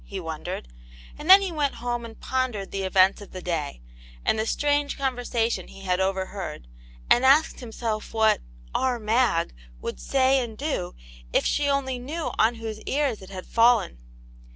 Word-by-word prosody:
'* -, -, -21 dB
he 195 Hz, -, -6 dB
wondered, 160 Hz, -, -5 dB, 0.5 s
and 310 Hz, -, -8 dB
then 390 Hz, +1 st, +10 dB
he 380 Hz, -, -2 dB
went 295 Hz, -4 st, 0 dB
home 240 Hz, 0 st, -3 dB
and 225 Hz, -1 st, -11 dB
pondered 255 Hz, -5 st, -1 dB
over -, -, -22 dB
the 195 Hz, -, -3 dB
events 190 Hz, +1 st, +3 dB
of 205 Hz, -, -10 dB
the 185 Hz, -, -6 dB
day, 155 Hz, -, -3 dB, 0.5 s
and 220 Hz, -, +2 dB
the 220 Hz, -, 0 dB
strange 290 Hz, +1 st, +1 dB
conversation 245 Hz, -3 st, -1 dB
he 195 Hz, -, -13 dB
had 180 Hz, -1 st, 0 dB
overheard, 190 Hz, -, -3 dB, 0.4 s
and 240 Hz, -, +5 dB
asked 280 Hz, +4 st, +4 dB
himself 225 Hz, -2 st, -4 dB
what 220 Hz, -1 st, +3 dB, 0.2 s
" -, -, -22 dB
our 255 Hz, -2 st, +1 dB
Mag 220 Hz, -, +1 dB
" -, -, -22 dB
would -, -, -4 dB
say 270 Hz, 0 st, +3 dB
and 230 Hz, -4 st, -5 dB
do 275 Hz, -, -3 dB, 0.4 s
if -, -, +2 dB
she 290 Hz, 0 st, +1 dB
only 265 Hz, -2 st, 0 dB
knew 305 Hz, +6 st, -4 dB
on 225 Hz, +2 st, +4 dB
whose 220 Hz, -2 st, -6 dB
ears 275 Hz, -6 st, 0 dB
it 190 Hz, -, -11 dB
had 185 Hz, -2 st, -7 dB
fallen. 230 Hz, -, +3 dB
230 Hz, 185 wpm, -25 LUFS, 195-265 Hz, 0.5 s, then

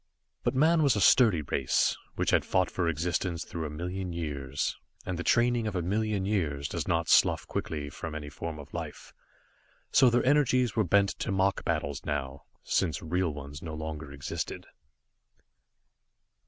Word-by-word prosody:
But -, -, -1 dB
man 160 Hz, +4 st, +4 dB
was 140 Hz, -6 st, +4 dB
a -, -, +1 dB
sturdy 100 Hz, -, +5 dB
race, 65 Hz, -1 st, +1 dB, 0.2 s
which -, -, 0 dB
had -, -, +4 dB
fought 95 Hz, -1 st, +1 dB
for 85 Hz, -3 st, 0 dB
existence 85 Hz, +2 st, -1 dB
through 80 Hz, -2 st, -4 dB
a -, -, -6 dB
million 90 Hz, +4 st, -4 dB
years, 70 Hz, -5 st, -3 dB, 0.3 s
and 90 Hz, -, -2 dB
the 90 Hz, -, -4 dB
training 120 Hz, 0 st, +2 dB
of 105 Hz, -, -3 dB
a 90 Hz, -, 0 dB
million 105 Hz, +1 st, 0 dB
years 75 Hz, -9 st, -1 dB
does -, -, -4 dB
not 85 Hz, -1 st, +1 dB
slough -, -, +4 dB
quickly 75 Hz, -2 st, -4 dB
from 80 Hz, +3 st, -6 dB
any 75 Hz, -1 st, -5 dB
form 80 Hz, +1 st, -5 dB
of 70 Hz, -, -11 dB
life, -, -, -7 dB, 0.8 s
so 130 Hz, -, +6 dB
their 120 Hz, +1 st, +2 dB
energies 130 Hz, -4 st, +3 dB
were 110 Hz, -, +3 dB
bent 100 Hz, +2 st, +3 dB
to -, -, -2 dB
mock 95 Hz, 0 st, +1 dB
battles 75 Hz, -4 st, -2 dB
now, 70 Hz, -2 st, -4 dB, 0.2 s
since 75 Hz, -5 st, 0 dB
real 90 Hz, +1 st, 0 dB
ones 70 Hz, 0 st, -8 dB
no 80 Hz, -2 st, -6 dB
longer 80 Hz, -2 st, -6 dB
existed. 70 Hz, 0 st, -5 dB
85 Hz, 170 wpm, -29 LUFS, 75-100 Hz, 0.8 s, so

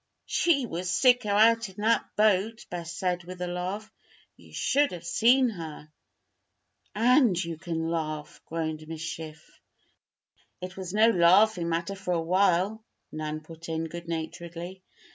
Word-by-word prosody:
"She 290 Hz, -7 st, +2 dB
was 180 Hz, -3 st, -4 dB
sicker 245 Hz, +1 st, +3 dB
out 225 Hz, +2 st, +4 dB
in 190 Hz, -, -15 dB
that 230 Hz, +1 st, +1 dB
boat," 215 Hz, +2 st, +2 dB
Bess 170 Hz, -1 st, -5 dB
said, 180 Hz, -1 st, -2 dB
with 180 Hz, +1 st, -9 dB
a 180 Hz, -, -2 dB
laugh. 185 Hz, +5 st, -4 dB, 0.4 s
"You -, -, -18 dB
should 290 Hz, +1 st, +1 dB
have 170 Hz, -1 st, -8 dB
seen 245 Hz, +7 st, +4 dB
her." 160 Hz, -6 st, -8 dB, 1.0 s
"And 240 Hz, -1 st, +4 dB
you 170 Hz, -1 st, -5 dB
can 165 Hz, -2 st, -3 dB
laugh?" 155 Hz, -2 st, -4 dB
groaned 160 Hz, -1 st, -4 dB
Miss 160 Hz, -1 st, -7 dB
Schiff. 160 Hz, -1 st, -8 dB, 1.0 s
"It 185 Hz, +1 st, -7 dB
was 185 Hz, -2 st, -6 dB
no 215 Hz, +3 st, +5 dB
laughing 180 Hz, 0 st, +4 dB
matter 170 Hz, +3 st, -1 dB
for 190 Hz, -2 st, -2 dB
a -, -, +1 dB
while," 185 Hz, +4 st, +1 dB, 0.3 s
Nan 155 Hz, 0 st, -4 dB
put 165 Hz, +1 st, -11 dB
in, 160 Hz, 0 st, -2 dB
good 170 Hz, +1 st, -8 dB
naturedly. 170 Hz, +2 st, -6 dB
180 Hz, 145 wpm, -27 LUFS, 165-215 Hz, 1.0 s, no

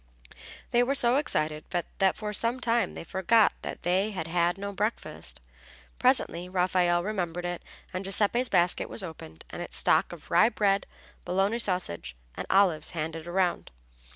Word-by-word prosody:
They 240 Hz, -, +4 dB
were 265 Hz, +3 st, +1 dB
so 250 Hz, -1 st, +4 dB
excited 155 Hz, -, 0 dB
that 190 Hz, +2 st, 0 dB
for 210 Hz, -1 st, -4 dB
some 230 Hz, +5 st, +1 dB
time 230 Hz, -5 st, +1 dB
they -, -, -6 dB
forgot 195 Hz, +5 st, +3 dB
they 185 Hz, +4 st, -1 dB
had 185 Hz, -6 st, -4 dB
had 175 Hz, +2 st, +1 dB
no 200 Hz, +1 st, -5 dB
breakfast. 210 Hz, +3 st, -4 dB, 0.6 s
Presently 250 Hz, -9 st, +2 dB
Raffaelle 180 Hz, -1 st, +2 dB
remembered 175 Hz, -4 st, -3 dB
it, 175 Hz, -1 st, -3 dB, 0.3 s
and 185 Hz, +2 st, -3 dB
Giuseppe's 210 Hz, +6 st, +2 dB
basket 175 Hz, +1 st, +2 dB
was -, -, -6 dB
opened 115 Hz, -, -9 dB
and -, -, -6 dB
its -, -, -6 dB
stock -, -, +3 dB
of -, -, -11 dB
rye 220 Hz, -, +6 dB
bread, 200 Hz, -4 st, +1 dB, 0.4 s
bologna 195 Hz, +5 st, 0 dB
sausage 180 Hz, -, -2 dB, 0.2 s
and -, -, -5 dB
olives 185 Hz, -6 st, +3 dB
handed 160 Hz, +1 st, -4 dB
around. 180 Hz, 0 st, 0 dB
190 Hz, 155 wpm, -28 LUFS, 175-215 Hz, 0.6 s, rye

